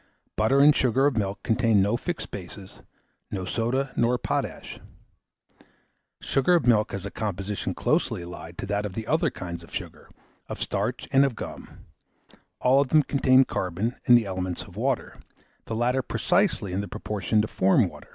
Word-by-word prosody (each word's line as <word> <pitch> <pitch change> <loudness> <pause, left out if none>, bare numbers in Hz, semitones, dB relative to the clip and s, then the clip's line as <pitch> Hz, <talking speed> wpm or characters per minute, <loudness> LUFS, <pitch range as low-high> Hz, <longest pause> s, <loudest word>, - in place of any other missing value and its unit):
Butter 110 +6 +3
and 145 +1 +7
sugar 130 +2 +2
of 145 -3 +2
milk 100 -2 -2
contain 115 -2 +2
no 100 +4 +2
fixed 170 +7 -4
bases, 95 0 -9 0.5
no 95 -2 -4
soda 120 +7 -1
nor 120 +1 +2
potash. - - -4 1.4
Sugar 135 +6 +2
of 170 - +1
milk 110 -3 +3
has 100 -1 -5
a 100 - -5
composition 100 -1 -3
closely - - 0
allied 85 -1 -9
to - - -4
that 100 +1 -1
of 105 -3 -5
the 110 - -4
other - - +1
kinds 85 -1 -7
of - - -16
sugar, - - -7 0.4
of - - -6
starch, - - -2
and 135 +1 +5
of 135 -4 0
gum; - - -9 0.8
all 130 +2 +5
of 140 - 0
them 155 +3 +4
contain 130 -2 +4
carbon 95 +6 -2
and 120 - +8
the 115 - 0
elements 95 -2 -3
of - - -15
water, - - -2 0.5
the 110 - -4
latter 125 +3 +1
precisely 175 - 0
in 95 - -1
the 100 - -6
proportion 105 +1 -1
to - - -2
form 95 -2 +3
water. - - -13
110 Hz, 175 wpm, -26 LUFS, 95-130 Hz, 1.4 s, and